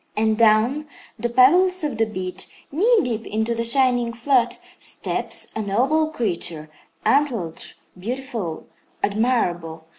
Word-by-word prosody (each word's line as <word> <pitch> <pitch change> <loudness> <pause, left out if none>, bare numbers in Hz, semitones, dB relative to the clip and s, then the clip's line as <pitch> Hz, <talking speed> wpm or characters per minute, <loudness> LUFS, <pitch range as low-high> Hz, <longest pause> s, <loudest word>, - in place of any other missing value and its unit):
And 220 0 +2
down 230 +7 +3 0.3
the 240 +2 -1
pebbles 350 +10 +4
of 275 -7 -2
the 225 - +3
beach, 185 -3 -5
knee 430 - +4
deep 230 -3 -2
into 220 +2 -1
the 230 0 -2
shining 245 -1 +2
flood, 245 +1 +1 0.2
steps - - -2
a 220 - -1
noble 260 +10 +1
creature, 170 - -2 0.3
antlered, 230 - +1 0.3
beautiful, 225 -4 -5 0.4
admirable. 175 -8 0
230 Hz, 120 wpm, -22 LUFS, 205-265 Hz, 0.4 s, pebbles